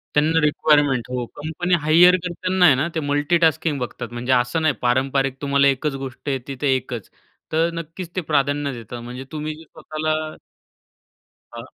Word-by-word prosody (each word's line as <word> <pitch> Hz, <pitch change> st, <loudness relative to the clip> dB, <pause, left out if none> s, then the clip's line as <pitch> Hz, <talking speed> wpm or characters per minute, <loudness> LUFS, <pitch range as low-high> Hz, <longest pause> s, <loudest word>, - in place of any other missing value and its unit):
त्यांना 155 Hz, +2 st, +3 dB
रिक्वायरमेंट 145 Hz, -4 st, +3 dB
हो. 125 Hz, -1 st, -2 dB
Company 160 Hz, +4 st, -3 dB
hire 170 Hz, +4 st, +6 dB
करताना 180 Hz, +1 st, +1 dB
आहे 145 Hz, -6 st, +7 dB
ना, 150 Hz, -, +1 dB
ते -, -, +1 dB
मल्टिटास्किंग 160 Hz, +1 st, +2 dB
बघतात. 120 Hz, 0 st, -6 dB
म्हणजे 125 Hz, +2 st, 0 dB
असं 120 Hz, +7 st, -1 dB
नाही 155 Hz, -, +3 dB
पारंपारिक 135 Hz, +1 st, +1 dB
तुम्हाला 140 Hz, -1 st, +3 dB
एकच 140 Hz, +1 st, -3 dB
गोष्ट 135 Hz, +2 st, -6 dB
येते 135 Hz, 0 st, -3 dB
तर -, -, 0 dB
एकच. 125 Hz, -4 st, -3 dB, 0.4 s
तर 165 Hz, +2 st, +2 dB
नक्कीच 165 Hz, +2 st, -8 dB
ते 185 Hz, -, 0 dB
प्राधान्य 145 Hz, 0 st, +1 dB
देतात. 115 Hz, +2 st, -8 dB
म्हणजे 125 Hz, +2 st, -7 dB
तुम्ही 155 Hz, 0 st, -4 dB
जे 160 Hz, -, -13 dB
स्वतःला 155 Hz, 0 st, -3 dB, 1.4 s
हां. -, -, -7 dB
145 Hz, 160 wpm, -22 LUFS, 130-160 Hz, 1.4 s, आहे